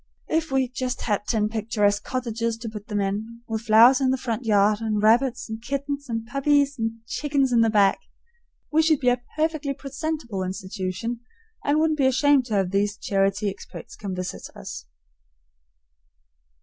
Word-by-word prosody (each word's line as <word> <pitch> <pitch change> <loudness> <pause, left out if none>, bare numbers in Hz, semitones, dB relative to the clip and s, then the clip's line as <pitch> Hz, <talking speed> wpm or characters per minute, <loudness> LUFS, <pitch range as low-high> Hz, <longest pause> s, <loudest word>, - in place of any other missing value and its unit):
If 320 0 0
we 265 -1 +1
just 255 0 -4
had 205 -2 -1
ten 215 -3 +1
picturesque 210 -2 0
cottages 230 -2 -2
to 225 0 -6
put 210 -1 -9
them 210 -1 -2
in, 215 +4 -3
with 220 -1 -3
flowers 230 +4 +6
in 265 - +3
the 260 - +2
front 240 -1 -3
yard 210 0 +3
and 215 -2 0
rabbits 235 +4 +3
and 220 0 -6
kittens 280 +2 -4
and 225 -1 -3
puppies 280 +3 +2
and 225 0 -3
chickens 275 0 0
in 235 -1 +4
the 225 - +4
back, 205 -2 +3 0.7
we 315 +1 +4
should 315 -2 +3
be 250 - +3
a 245 0 +1
perfectly 310 -3 -1
presentable 275 -7 -4
institution, 185 +4 -4 0.4
and 290 +1 +2
wouldn't 310 -1 +1
be 265 - +4
ashamed 275 0 +3
to 215 - -1
have 190 -2 +1
these 205 +1 0
charity 195 +1 0
experts 195 - -8
come 195 -3 -5
visiting 185 0 -6
us. - - -8
230 Hz, 170 wpm, -24 LUFS, 210-270 Hz, 0.7 s, flowers